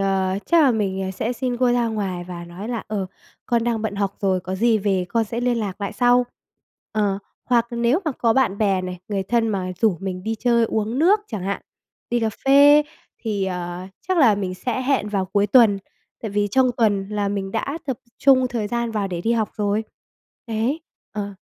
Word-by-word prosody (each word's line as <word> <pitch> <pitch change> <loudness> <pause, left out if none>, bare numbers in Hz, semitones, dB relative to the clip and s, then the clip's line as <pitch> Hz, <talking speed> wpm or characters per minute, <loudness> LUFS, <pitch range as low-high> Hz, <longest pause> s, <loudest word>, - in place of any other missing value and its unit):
ờ, 190 -1 +1
chắc 335 -2 +5
là 270 - +5
mình 190 -4 -1
sẽ 220 +5 -2
xin 250 -1 -2
cô 245 -1 +3
ra 240 -1 +2
ngoài 195 -5 -3
và 175 -1 -6
nói 180 +6 -8
là, 235 -2 -3
ờ, 200 -3 -2 0.4
"Con 235 -1 +1
đang 230 -2 0
bận 220 -2 -2
học 200 -1 -2
rồi, 190 -2 +1
có 185 +1 -5
gì 225 +2 +3
về 195 -3 0
con 230 +2 +1
sẽ 230 +3 -4
liên 245 -1 +1
lạc 205 -2 -4
lại 200 - -3
sau." 245 0 +4 0.7
Ờ, 205 -2 0 0.3
hoặc 240 -1 +2
nếu 235 +6 +1
mà 310 - 0
có 230 -2 +1
bạn 225 -6 +1
bè 195 -3 +2
này, 180 -1 -5
người 200 -2 -1
thân 230 +3 +1
mà 185 -3 -2
rủ 215 -6 +3
mình 185 -1 -4
đi 225 +2 -2
chơi 235 +1 +2
uống 220 +3 -1
nước 390 +7 +4
chẳng 210 -6 -4
hạn, 200 +1 -3 0.5
đi 240 - +1
cà 225 - +1 0.2
phê 285 +2 +7 0.4
thì, 210 -4 -1
ờ, 180 -1 -4 0.2
chắc 370 -2 +2
là 235 -8 +6
mình 190 -2 -3
sẽ 245 +7 -3
hẹn 260 -5 +1
vào 195 -2 0
cuối 200 +2 +1
tuần. 215 -2 +5 0.4
Tại 220 - -3
vì 205 0 0
trong 255 +3 +3
tuần 205 -4 +1
là 205 -1 -1
mình 200 -1 -3
đã 275 +7 -2
tập 265 - -1 0.2
trung 260 -2 +5
thời 230 -4 -2
gian 235 -1 -1
vào 210 -3 -1
để 175 -2 -4
đi 225 +6 +1
học 220 -3 0
rồi. 210 +1 0 0.6
Đấy. 235 +8 -1 0.3
Ờ. 205 -1 -4
215 Hz, 215 wpm, -22 LUFS, 195-240 Hz, 0.7 s, phê